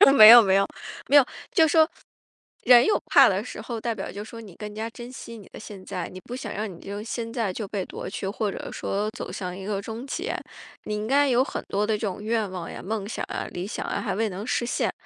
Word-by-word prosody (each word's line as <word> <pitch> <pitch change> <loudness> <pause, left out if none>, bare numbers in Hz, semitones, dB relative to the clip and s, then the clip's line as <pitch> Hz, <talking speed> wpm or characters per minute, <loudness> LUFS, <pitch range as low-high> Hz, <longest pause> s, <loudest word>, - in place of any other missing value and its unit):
没 215 -4 +11
有 240 +1 +12
没 195 -3 +3
有。 195 0 +4 0.4
没 285 - +3
有， 285 -3 +8 0.3
就 325 -4 +5
说， 315 +1 +5 0.8
人 245 -1 +8
有 425 - +3
怕 - - +7
的 - - -1
时 - - -8
候， 235 -2 -5
代 230 +1 -2
表 200 -3 -6
就 205 +2 -6
说 230 +1 -10
你 200 -6 -12
更 210 -1 -7
加 220 +2 -4
珍 240 +1 -10
惜 230 -2 -9
你 205 - -13
的 - - -11
现 205 -3 -10
在。 180 - -4
你 185 - -9
不 245 - -7
想 260 - -6
让 210 0 -3
你 170 - -13
这 200 - -7
个 205 - -5
现 230 0 -4
在 230 -5 -1
就 210 +1 -5
被 195 -2 -3
夺 - - -7
去， 190 - -4
或 205 +1 -2
者 - - -7
说 205 +2 -2
走 - - -6
向 180 -1 -5
一 190 0 -8
个 200 -1 -2
终 225 +4 -7
结。 355 - -3 0.5
你 210 - -2
应 210 0 -3
该 285 +3 +4
有 250 0 +4
很 - - -5
多 205 +1 +1
的 220 - 0
这 210 - -2
种 200 +2 -5
愿 220 -2 0
望 180 -2 -6
呀， - - -8
梦 205 +1 -3
想 220 - -4
啊， - - -3
理 180 +2 -5
想 - - -4
啊， - - -2
还 195 -5 -2
未 220 +1 0
能 195 +2 -6
实 240 - 0
现。 240 - 0
215 Hz, 285 characters per minute, -25 LUFS, 195-235 Hz, 0.8 s, 有